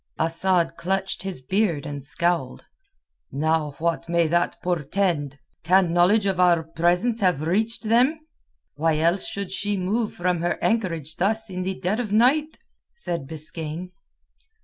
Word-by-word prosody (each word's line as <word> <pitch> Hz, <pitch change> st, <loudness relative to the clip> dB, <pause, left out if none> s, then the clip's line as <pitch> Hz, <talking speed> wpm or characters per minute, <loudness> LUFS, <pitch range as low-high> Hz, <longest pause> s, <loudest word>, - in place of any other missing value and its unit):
Asad 170 Hz, +1 st, +1 dB
clutched 190 Hz, +1 st, -2 dB
his 190 Hz, -7 st, -5 dB
beard, 170 Hz, 0 st, 0 dB
and 145 Hz, -2 st, -6 dB
scowled. 165 Hz, -1 st, -1 dB, 0.7 s
"Now 155 Hz, 0 st, 0 dB
what 170 Hz, 0 st, -2 dB
may 170 Hz, -1 st, +3 dB
that 175 Hz, +1 st, 0 dB
portend? 165 Hz, -3 st, -1 dB, 0.3 s
Can 180 Hz, 0 st, +3 dB
knowledge 190 Hz, +5 st, +4 dB
of 190 Hz, -2 st, 0 dB
our 175 Hz, -2 st, +4 dB
presence 175 Hz, +8 st, +1 dB
have 180 Hz, -7 st, +1 dB
reached 215 Hz, +9 st, 0 dB
them?" 245 Hz, +8 st, +3 dB, 0.5 s
"Why 155 Hz, +1 st, +1 dB
else 170 Hz, +4 st, +1 dB
should 200 Hz, -2 st, -5 dB
she 205 Hz, +1 st, -1 dB
move 210 Hz, +5 st, -1 dB
from 175 Hz, -1 st, 0 dB
her 175 Hz, -, 0 dB
anchorage 165 Hz, -9 st, -1 dB
thus 220 Hz, +3 st, 0 dB
in 185 Hz, 0 st, -4 dB
the 185 Hz, 0 st, -3 dB
dead 190 Hz, +4 st, -1 dB
of 225 Hz, -5 st, -3 dB
night?" 275 Hz, +8 st, +3 dB, 0.3 s
said 170 Hz, -, -4 dB
Biskaine. 160 Hz, +3 st, -6 dB
180 Hz, 145 wpm, -24 LUFS, 165-200 Hz, 0.7 s, knowledge